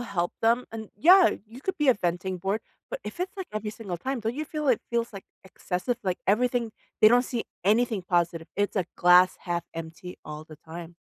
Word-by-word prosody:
help 190 -7 -2
them. 235 +2 +3
And, 220 -2 -6
yeah, 360 - +7 0.2
you 235 +4 -12
could 380 - -3
be 295 -2 +2
a 255 - +7
venting 180 -1 -2
board, 195 +4 -1 0.3
but - - -4
if 350 - -7
it's, 375 +2 -3
like, 380 - -5
every 215 0 -3
single 195 -6 -6
time, 260 +3 -3
don't 225 +2 -2
you 305 +1 -4
feel 300 -3 -3
it 245 - +3
feels, 235 -1 -1
like, 195 - -9 0.2
excessive? 190 +5 -3
Like, 185 -2 -1
everything 235 +2 +1 0.3
they 215 - +10
don't 245 +1 +5
see 240 -2 -3 0.2
anything 220 -1 +2
positive. 170 -2 0
It's 205 +1 0
a 180 -3 +1
glass 180 +1 +6
1/2 170 -1 -2
empty 165 +2 -7
all 150 0 -7
the 155 -1 -13
time. 165 +1 -9
210 Hz, 210 wpm, -27 LUFS, 175-245 Hz, 0.3 s, they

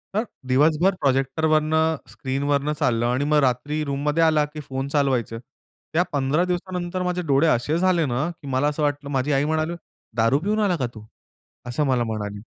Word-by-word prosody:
तर 215 - +2 0.2
दिवसभर 155 +8 +3
प्रोजेक्टरवरनं 155 +4 +2
स्क्रीनवरनं 140 +2 -1
चाललं 120 -5 +1
आणि 130 +4 0
मग 150 - +4
रात्री 145 +5 0
रूममध्ये 145 +3 0
आला, 155 -2 +3
की 150 +1 -9
फोन 135 -1 -4
चालवायचे. 130 -6 0 0.6
त्या 175 +2 +3
15 140 +5 +1
दिवसानंतर 180 0 -3
माझे 180 0 -1
डोळे 140 +4 +3
असे 145 +4 +1
झाले 175 -3 +2
ना, 135 +6 -1
की 140 - -10
मला 135 +2 +1
असं 150 +1 -1
वाटलं 145 -1 -1
माझी 135 +1 0
आई 140 +2 +2
म्हणाली 160 +2 0 0.4
"दारू 115 +5 +3
पिऊन 210 +5 -1
आला 200 -4 +2
का 125 -3 -1
तू?" 110 -1 -11 0.6
असं 120 +5 -1
मला 125 -3 +2
म्हणाली. 105 -2 -4
145 Hz, 170 wpm, -23 LUFS, 130-160 Hz, 0.6 s, मग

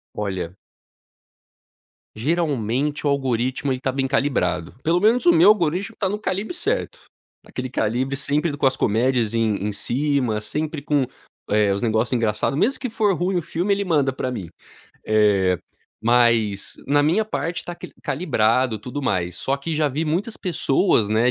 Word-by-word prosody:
Olha 95 -4 -3 1.6
geralmente 145 0 -1
o - - +3
algoritmo, 130 0 0
ele 130 - -3
tá 135 - 0
bem 135 0 -1
calibrado, 120 - 0
pelo 170 +2 +2
menos 225 +5 +3
o 345 - +8
meu 330 -7 +6
algoritmo 195 +1 +2
tá 195 - 0
no 205 - -2
calibre 210 - -3
certo. 415 +8 -1 0.5
Aquele 130 0 -6
calibre 130 +3 -1
sempre 145 +4 +1
do 145 - -7
com 140 - +2
as 130 - +2
comédias 115 0 +1
em 110 -2 +1
em 105 - -2
cima, 130 0 0
sempre 150 +6 -3
com, 145 -2 +1 0.4
eh, 105 -1 +3
os 100 - -2
negócio 110 +1 +1
engraçado, 110 +1 0
mesmo 250 - +1
que 255 - -3
for 215 -3 +1
ruim 180 +2 -1
o - - -2
filme, 175 +5 -1
ele 200 0 +1
manda 145 -7 +2
pra 130 0 -3
mim. 105 -9 -5 0.6
Eh, 100 -4 +3 0.4
mas 115 -4 +3
na 145 +1 +3
minha 170 +9 +2
parte 175 -5 -3
tá 175 - -6
que - - -10
calibrado, 125 -6 +1
tudo 125 +7 -6
mais, 90 -8 -1
só 135 - -1
que 160 +3 -4
já 155 0 +2
vi 145 +4 -2
muitas 190 +9 -1
pessoas, 155 - +1
né, 115 +3 +3
135 Hz, 170 wpm, -22 LUFS, 110-165 Hz, 1.6 s, o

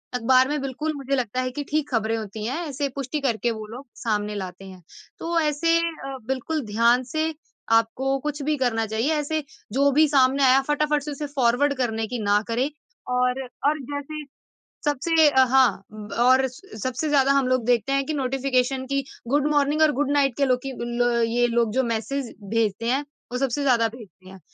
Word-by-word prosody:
अखबार 255 +2 +4
में 295 -1 -1
बिल्कुल 275 +4 -3
मुझे 275 0 -2
लगता 255 0 -1
है 255 0 -2
कि 290 +2 -4
ठीक 300 -1 0
खबरें 225 -1 0
होती 215 0 -6
हैं, 260 +7 -2
ऐसे 285 0 -2
पुष्टि 280 +2 -3
करके 240 -2 0
वो 215 -1 -6
लोग 250 +5 -9
सामने 210 -2 -2
लाते 190 0 -6
हैं। 185 -1 -12 0.4
तो 335 0 0
ऐसे 320 +2 +2
अ, 315 -5 -4
बिल्कुल 265 +4 -2
ध्यान 235 +4 +3
से 315 +1 0 0.5
आपको 265 +4 -2
कुछ 295 +1 -4
भी 305 +1 +1
करना 225 -4 0
चाहिए। 225 +9 0
ऐसे 300 +1 -1 0.3
जो 280 +1 +3
भी 305 +3 +5
सामने 270 0 +3
आया 260 +1 +6
फटाफट 295 -1 +1
से 300 - -5
उसे 290 +1 -5
फॉरवर्ड 260 +3 +3
करने 225 -3 -1
की 245 0 -4
ना 205 +1 +3
करें 245 +5 0 0.5
और 250 +1 +1 0.3
और 305 0 +1
जैसे 295 +2 -5 0.6
सबसे 300 +2 +3
अ, 265 -1 +5
हाँ 245 -7 +3
ब 210 -1 -9
और 260 +2 +5
स 255 - -12
सबसे 260 +4 -2
ज़्यादा 275 -1 +4
हम 275 -2 +2
लोग 255 -2 +1
देखते 245 +2 +2
हैं 275 0 +1
कि 310 - -2
नोटिफ़िकेशन 260 -1 0
कि, 275 0 -1 0.2
गुड 290 +3 +2
मॉर्निंग 295 +1 +2
और 310 - +5
गुड 285 -1 +1
नाइट 275 -4 +2
के 280 - +2
लो 255 -1 +3
की 270 - -3 0.3
ल 240 -1 +2
ये 240 +1 +2
लोग 235 -2 +1
जो 260 - +3
मैसेज़ 235 +3 -3 0.2
भेजते 225 -1 0
हैं, 275 +3 +1 0.3
वो 250 - -1
सबसे 270 +1 -1
ज़्यादा 235 -4 +3
भेजते 215 -5 -14
हैं। 190 -1 -13
260 Hz, 200 wpm, -24 LUFS, 235-290 Hz, 0.6 s, आया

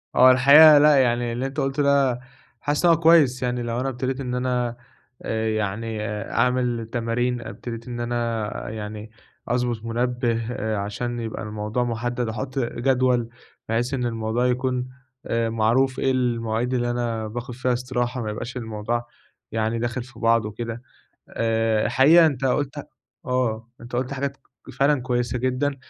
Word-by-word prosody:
هو 130 0 +8
الحقيقة 145 +4 +8
لأ، 150 0 +6
يعني 120 -2 +2
اللي 125 +3 -2
أنت 135 +3 -4
قُلته 135 +1 0
ده 140 -3 +3 0.4
حاسس 145 +4 0
إن 170 - +7
هو 165 - +4
كويس 155 -6 +5
يعني، 125 -1 -1
لو 120 0 -2
أنا 135 +1 -1
ابتديت 130 +1 -3
إن 125 -2 -3
أنا 125 -1 -1 0.4
آآ، 110 0 -2
يعني 110 +1 -2 0.3
أعمل 125 -2 +1
تمارين 120 +1 -1
ابتديت 115 +3 -7
إن 120 -1 -5
أنا 115 -2 -2
يعني 105 0 -7 0.4
أضبط 120 -2 -1
منبّه، 120 0 -1 0.4
عشان 120 +4 -3
يبقى 115 -1 -5
الموضوع 105 +3 -2
محدّد، 120 +1 -2
أحط 130 +5 -4
جدول 125 -1 +1 0.4
بحيث 120 +4 0
إن 125 -2 -1
الموضوع 115 +1 -1
يكون 125 0 -1 0.4
آآ، 115 0 0
معروف 120 +4 +1
إيه 135 - +2
المواعيد 120 -1 -1
اللي 120 -1 0
أنا 115 -2 -2
باخد 120 +3 -6
فيها 125 0 0
استراحة، 125 0 -2
ما 110 - -3
يبقاش 120 +4 -6
الموضوع 115 +1 -3 0.5
يعني 110 +1 -1
داخل 120 +1 -2
في 130 +2 -15
بعضه 115 -2 +2
وكده، 115 +2 -6 0.5
آآ، 115 -1 +1
حقيقة 160 +6 +6
أنت 135 -4 0
قُلت 145 +2 -1 0.4
آه 115 -3 -1
أنت 120 +1 -7
قُلت 130 +2 -2
حاجات 140 0 -3 0.4
فعلًا 140 0 +3
كويسة 120 -1 -1
جدًا، 130 +3 0
120 Hz, 155 wpm, -23 LUFS, 115-130 Hz, 0.5 s, هو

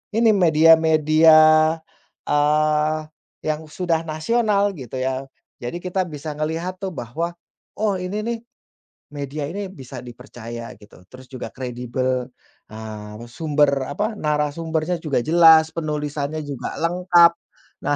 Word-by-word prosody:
ini, 225 -1 +5
media-media, 160 -2 +5 0.9
eee, 150 +1 +2 0.5
yang 155 0 -1
sudah 165 0 -1
nasional, 205 +5 +1
gitu, 130 -2 -8
ya, 130 +1 -2 0.3
jadi 120 +8 -4
kita 185 0 -1
bisa 150 -1 -6
ngelihat, 165 +4 -3
tuh, 190 - -3
bahwa, 155 +8 -4 0.4
oh, 210 -2 +1
ini, 190 +4 -3
nih, 235 -1 -2 0.7
media 145 +1 -4
ini 195 +1 -5
bisa 130 -6 -10
dipercaya, 120 -1 -9
gitu, 105 -3 -17
terus 130 0 -13
juga 130 - -6
kredibel, 125 0 -3 0.4
ah, 110 -1 -8
me 120 - -9
sumber 150 0 +2 0.2
apa, 210 +10 -2
narasumbernya 155 +3 -1
juga 150 -6 0
jelas, 160 0 +6
penulisannya 150 -1 -3
juga 140 -3 -5
lengkap. 175 0 +5 0.5
Nah, 145 - +2
155 Hz, 120 wpm, -22 LUFS, 135-170 Hz, 0.9 s, jelas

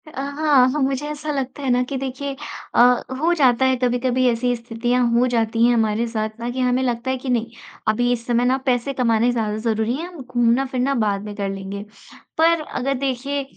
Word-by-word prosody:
अ, - - -11
हाँ, 285 -2 +3
हाँ, 300 - -2
मुझे 270 +2 -1
ऐसा 300 0 -4
लगता 270 0 -4
है 265 - -1
ना 250 0 +3
कि 275 - -2
देखिए 270 +1 -4 0.4
अ, - - +4 0.4
हो 335 +3 +2
जाता 265 -5 +3
है 260 0 +3
कभी-कभी 250 +1 +1
ऐसी 245 +1 0
स्थितियाँ 240 +1 -1
हो 240 +2 +3
जाती 230 -1 +1
हैं 240 - +4
हमारे 225 0 +1
साथ 220 -1 -2
ना 235 +1 -3
कि 255 - -5
हमें 250 0 +2
लगता 245 0 -1
है 260 - -1
कि 260 +1 -6
नहीं, 235 -2 0 0.4
अभी 245 +3 +2
इस 235 -1 -5
समय 240 0 +2
ना 255 +1 +3
पैसे 250 +2 0
कमाने 235 -2 +2
ज़्यादा 215 -3 -1
ज़रूरी 220 +1 0
हैं, 335 +3 -5
हम 350 -5 -10
घूमना-फिरना 250 +2 +1
बाद 200 -1 -1
में 210 -1 -7
कर 200 -1 -2
लेंगे। 195 +1 -6 0.5
पर 330 0 +4
अगर 275 -2 -2
देखिए 275 +2 -2
250 Hz, 210 wpm, -21 LUFS, 230-270 Hz, 0.5 s, अ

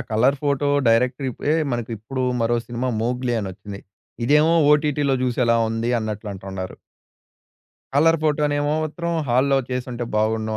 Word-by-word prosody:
Colour 125 +6 +3
photo 145 0 +1 0.2
డైరెక్ట్‌రిపే 125 +4 +1 0.2
మనకిప్పుడు 120 +2 -4 0.2
మరో 120 +1 +2
cinema 120 +1 -3
'Mowgli' 125 0 -1
అనొచ్చింది. 100 +1 -7 0.5
ఇదేమో 150 +4 +4 0.2
ఓటిటిలో 150 -2 +2
జూసేలా 120 -2 +2
ఉంది 115 +1 -2
అన్నట్లంటున్నారు. 100 -3 -5 1.2
కలర్ 165 +2 +4
ఫోటోనేమో 150 -1 +1
మాత్రం 170 +2 -4 0.2
హాల్లో 135 +3 +3
చేసుంటే 125 -1 -3
బావుండును 110 0 0
125 Hz, 110 wpm, -22 LUFS, 110-145 Hz, 1.2 s, ఇదేమో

